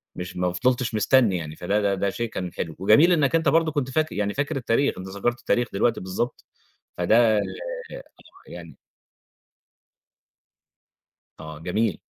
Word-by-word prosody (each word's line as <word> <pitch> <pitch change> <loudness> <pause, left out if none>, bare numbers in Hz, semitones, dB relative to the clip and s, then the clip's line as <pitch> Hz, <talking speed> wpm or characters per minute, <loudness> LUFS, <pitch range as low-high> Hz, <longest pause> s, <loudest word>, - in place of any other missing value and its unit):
مش 90 0 -7
ما 90 0 0
فضِلتش 125 +3 0
مستنّي 105 -2 +3
يعني 80 -2 -7
فده 100 +5 -1
ده 100 -1 +1
ده 100 +1 -1
شيء 120 +3 -4
كان 90 -5 -5
حلو 80 -3 -5
وجميل 110 - +5
إنك 155 -3 +2
أنت 160 -3 +2
برضه 160 +2 +2
كنت 145 -4 -2
فاكر 155 +4 -1
يعني، 105 -1 -1
فاكر 145 +2 -2
التاريخ 135 +1 0
أنت 95 - -7
ذكرت 100 +6 -2
التاريخ 120 0 0
دلوقتي، 115 +4 +1
بالضبط 95 +6 -4 0.5
فده 110 +4 +4 1.1
يعني 85 -2 -11 2.6
آه 80 -1 -9
جميل. 95 +4 -1
110 Hz, 145 wpm, -24 LUFS, 90-130 Hz, 2.6 s, وجميل